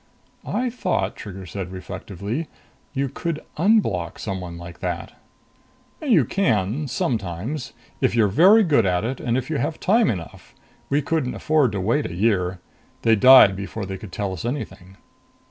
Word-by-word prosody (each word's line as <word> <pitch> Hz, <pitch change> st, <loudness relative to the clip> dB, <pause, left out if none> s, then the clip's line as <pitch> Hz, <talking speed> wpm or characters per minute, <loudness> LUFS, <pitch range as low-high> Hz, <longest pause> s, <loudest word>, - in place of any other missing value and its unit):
"I 250 Hz, 0 st, -1 dB
thought," 195 Hz, -7 st, -1 dB
Trigger 95 Hz, -2 st, -8 dB
said 95 Hz, 0 st, -6 dB
reflectively, 100 Hz, -, -5 dB, 0.5 s
"you 135 Hz, +1 st, 0 dB
could 160 Hz, +4 st, -4 dB, 0.2 s
_un_block 150 Hz, -, +1 dB
someone 90 Hz, -4 st, -5 dB
like 85 Hz, 0 st, -10 dB
that." 90 Hz, -2 st, -4 dB, 0.9 s
"You 225 Hz, -, +4 dB
can, 120 Hz, -, 0 dB
sometimes. 115 Hz, -, -3 dB, 0.3 s
If -, -, +2 dB
you're 110 Hz, -3 st, +4 dB
very 190 Hz, -, +6 dB
good 140 Hz, -, +3 dB
at 90 Hz, 0 st, +1 dB
it 130 Hz, +2 st, -3 dB
and 120 Hz, +1 st, 0 dB
if 130 Hz, +4 st, -3 dB
you 150 Hz, -, 0 dB
have 160 Hz, -, -2 dB
time 220 Hz, +2 st, +3 dB
enough. 85 Hz, -6 st, -6 dB, 0.3 s
We 145 Hz, +1 st, +1 dB
couldn't 150 Hz, -4 st, -1 dB
afford 150 Hz, -6 st, +2 dB
to 100 Hz, -, -2 dB
wait 115 Hz, +10 st, +1 dB
a 85 Hz, -, -7 dB
year. 95 Hz, -3 st, +1 dB, 0.4 s
They 115 Hz, -1 st, +5 dB
died 125 Hz, -3 st, +8 dB
before 100 Hz, +2 st, -5 dB
they 95 Hz, 0 st, -6 dB
could 105 Hz, -, -10 dB
tell 100 Hz, +1 st, -3 dB
us 90 Hz, -, -6 dB
anything." 105 Hz, -7 st, -5 dB
110 Hz, 160 wpm, -23 LUFS, 95-150 Hz, 0.9 s, died